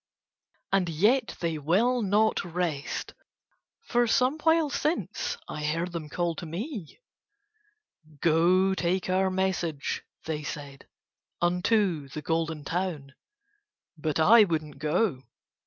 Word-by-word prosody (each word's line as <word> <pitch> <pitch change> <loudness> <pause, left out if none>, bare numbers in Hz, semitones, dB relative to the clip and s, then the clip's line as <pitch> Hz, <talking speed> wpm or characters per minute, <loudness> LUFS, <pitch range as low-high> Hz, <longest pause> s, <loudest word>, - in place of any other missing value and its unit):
And 190 -3 +2
yet 215 - +2
they 165 -2 -1
will 220 - +2
not 210 +2 +2
rest, 170 -5 -3 0.7
for 240 - +2
some 255 +6 +2
while 320 -1 +3
since 335 +11 -1
I 150 - -5
heard 165 +4 -1
them 165 -3 -5
call 175 +2 -1
to - - -5
me. 200 - -6 1.2
"Go 175 +5 +4
take 185 0 -1
our 190 +1 +2
message," 185 -6 -1 0.2
they 155 -1 -3
said, 145 -2 -8 0.5
"unto 180 -3 +1
the 150 +2 -7
Golden 160 -1 -1
Town." 165 -6 -3 0.8
But 155 -1 -2
I 215 +8 +8
would 165 -5 0
not 150 -2 -13
go. 155 -1 +1
175 Hz, 120 wpm, -27 LUFS, 155-205 Hz, 1.2 s, I